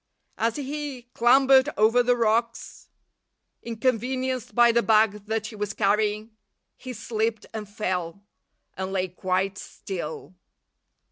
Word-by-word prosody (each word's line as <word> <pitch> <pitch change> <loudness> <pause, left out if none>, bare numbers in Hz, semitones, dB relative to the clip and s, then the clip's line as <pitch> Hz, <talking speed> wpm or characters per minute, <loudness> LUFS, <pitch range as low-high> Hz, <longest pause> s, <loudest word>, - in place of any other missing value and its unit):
As 230 0 +1
he 285 -2 -5
clambered 265 +3 +5
over 225 +3 +4
the 245 0 +2
rocks, 230 +1 -1 0.7
inconvenienced 255 +2 -2
by 240 -1 +6
the 235 +1 +3
bag 215 -2 +2
that 220 0 -1
he 220 - -7
was 210 0 -3
carrying, 210 +1 0 0.4
he 255 - -8
slipped 220 -1 -2
and 215 -2 -6
fell, 185 -3 -3 0.5
and 190 0 -4
lay 190 -1 -1
quite 185 +2 -2
still. 175 -2 -7
220 Hz, 120 wpm, -25 LUFS, 205-245 Hz, 0.7 s, by